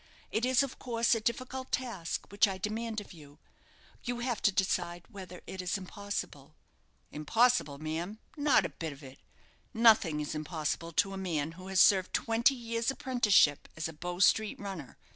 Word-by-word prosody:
It 225 +3 +1
is, 255 +1 +4
of 275 - -6
course, 235 -2 +1
a 225 - 0
difficult 255 +3 -3
task 230 -10 -3
which 205 +2 +4
I 190 -1 -3
demand 220 +3 -3
of 205 - -11
you. 145 -3 -15 0.7
You 245 0 -2
have 240 -3 -2
to 205 - +4
decide 175 -2 -1
whether 185 -5 -10
it 190 - -6
is 180 +2 -1
impossible." 185 -7 -6 0.6
"Impossible! 185 - +2
ma'am 160 +7 -4 0.2
not 290 -3 +3
a - - -2
bit 160 -3 -6
of 140 +1 -15
it. 135 0 -12 0.6
Nothing 220 -9 +5
is 150 0 -3
impossible 155 +1 -3
to 195 +4 +2
a - - -5
man 165 -5 -2
who 185 +3 -11
has 190 -1 +1
served 190 -3 +5
twenty 235 +4 +2
years' 230 -1 -2
apprenticeship 240 - +3
as 160 - -2
a 160 - -8
Bow 175 +3 -5
Street 215 +3 +3
runner. 190 -9 -7
195 Hz, 175 wpm, -31 LUFS, 165-230 Hz, 0.7 s, Nothing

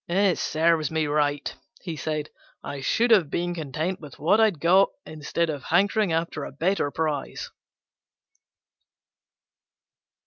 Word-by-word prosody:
"It 190 +1 +2
serves 160 -1 +1
me 160 -1 0
right," 145 -1 0 0.3
he 170 -4 -4
said; 155 0 -3 0.3
"I 140 - -6
should 235 - +1
have 185 -10 +5
been 175 +3 -2
content 160 +3 -3
with 150 -3 -11
what 190 +9 +3
I - - +7
had 195 -8 -1
got, 185 +5 +5 0.2
instead 155 +2 -2
of 145 -4 -7
hankering 200 +3 +2
after 165 -2 -2
a - - -6
better 165 +2 0
prize." 150 -2 -3
160 Hz, 135 wpm, -25 LUFS, 150-180 Hz, 0.3 s, I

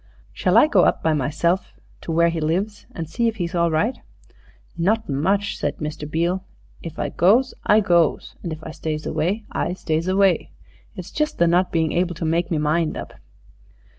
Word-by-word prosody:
"Shall - - +2
I - - +8
go 200 -12 +4
up - - +1
by 160 - +3
myself 155 +6 0 0.3
to - - -5
where 170 +1 +4
he 165 -1 -3
lives 190 +7 -2
and 165 -2 -6
see 235 +9 0
if 225 - -1
he's 175 -3 -3
all 170 -1 +2
right?" 165 +11 0 0.8
"Not 210 +7 +1
much," 190 +9 0
said 145 - -2
Mr. 150 -1 -5
Beale; 170 +4 0 0.4
"if 165 -1 -8
I - - -2
goes 235 +9 +3
I 210 +1 +6
goes, 170 -5 +1
and 170 - -5
if 155 0 -7
I 160 - -6
stays 155 -1 -4
away 180 +8 -1
I 175 - -1
stays 160 -2 -2
away. 190 -1 +2 0.4
It's - - -8
just 305 0 -1
the 170 - +4
not 175 +2 +2
being 160 -2 +1
able 175 0 0
to 165 - -4
make 170 +2 0
me 165 - 0
mind 155 +2 0
up." - - -7
170 Hz, 195 wpm, -22 LUFS, 160-190 Hz, 0.8 s, I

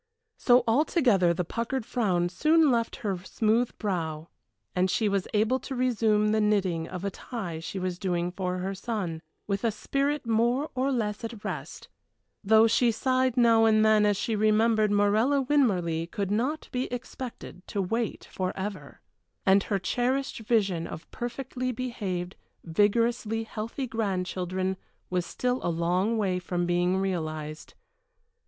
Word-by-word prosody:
So 245 0 +5
altogether 235 - +3
the 175 +1 -1
puckered 230 +5 -3
frown 185 -9 +1
soon 310 - +4
left 230 -1 0
her 195 -3 -1
smooth 220 +5 0
brow, 165 -5 -3 0.5
and 185 +1 +2
she 215 +3 +1
was 195 -2 0
able 220 +5 +2
to 265 - -6
resume 220 -4 +2
the 215 0 +2
knitting 190 -6 +1
of 180 +1 -6
a 200 - -1
tie 185 -8 -6
she 165 +4 -6
was 185 -1 -3
doing 175 -2 -1
for 180 0 -3
her 190 +2 -3
son, 190 -6 -4 0.2
with 200 -1 -2
a 230 - +3
spirit 275 +6 -1
more 235 +6 +1
or 260 +2 0
less 215 -5 -2
at 230 -2 -6
rest, - - -6 0.6
though 220 +2 +6
she 235 +2 +3
sighed 255 +1 +1
now 230 -2 +5
and 215 -1 +4
then 215 -1 +5
as 205 -1 +2
she 225 +2 -1
remembered 215 +1 +3
Morella 210 +7 +3
Winmarleigh 180 - +1
could 200 +1 -3
not 260 +9 -1
be 250 0 -2
expected 245 -5 -7
to 205 - -3
wait 225 +4 -2
forever 190 +1 -5 0.4
and 195 +1 +5
her 200 - 0
cherished 250 +8 -1
vision 200 -7 0
of 160 - -9
perfectly 255 +1 -4
behaved, 200 -8 -4 0.3
vigorously 225 +5 +1
healthy 225 +4 -5
grandchildren 185 -4 -2 0.3
was 180 -1 0
still 250 0 -1
a - - -1
long 180 +6 +1
way 190 -4 0
from 175 0 -2
being 175 +1 +1
realized. 155 -5 -4
210 Hz, 150 wpm, -27 LUFS, 185-240 Hz, 0.6 s, though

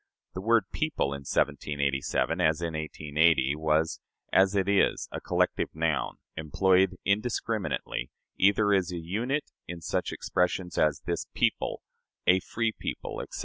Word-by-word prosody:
The 95 - -5
word 115 +1 +4
"people" 155 - -1
in 70 0 -7
1787, 70 +4 0
as 80 -2 +3
in 85 -1 -3
1880, 75 -2 +1
was, 80 +1 +1 0.3
as 95 +1 +4
it 95 -1 +1
is, 100 -1 +2
a - - -5
collective - - 0
noun, 80 -4 0 0.2
employed 95 +4 +2
indiscriminately, 105 - -1 0.3
either 100 +2 +4
as 95 -2 +1
a 90 - -4
unit 115 - -2 0.2
in 85 -1 -6
such 80 - -2
expressions 90 0 -1
as 75 -1 +2
"this 85 - -2
people," - - 0 0.4
"a 95 +1 +5
free 115 +4 -1
people," - - -5
etc. - - -7
90 Hz, 140 wpm, -28 LUFS, 80-100 Hz, 0.4 s, a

